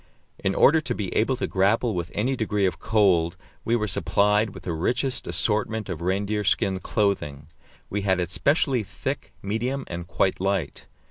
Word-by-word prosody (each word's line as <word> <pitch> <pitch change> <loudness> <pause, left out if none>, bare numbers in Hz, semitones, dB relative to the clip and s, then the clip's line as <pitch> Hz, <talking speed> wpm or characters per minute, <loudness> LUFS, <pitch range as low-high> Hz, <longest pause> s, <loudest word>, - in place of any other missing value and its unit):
In 95 - 0
order 160 +3 +5
to 125 -5 -3
be 100 -4 -3
able 125 +5 +2
to - - -1
grapple 105 +5 +2
with 85 -2 -3
any 125 +6 +1
degree 105 -4 0
of 95 - -1
cold, 95 -7 +2 0.3
we 115 - +1
were 110 -2 0
supplied 105 +2 +2
with - - -11
the 85 - -3
richest 125 - -1
assortment 110 0 -1
of 85 -3 -4
reindeer 100 +4 0
skin 95 -1 +1
clothing; 75 -9 -1 0.4
we 105 - -2
had 95 -2 +1
it 90 -1 -2
specially 140 - +2
thick, 100 - -5
medium, 120 +7 -2
and 85 0 -6
quite 95 0 0
light. 95 -6 -2
105 Hz, 175 wpm, -25 LUFS, 95-115 Hz, 0.4 s, order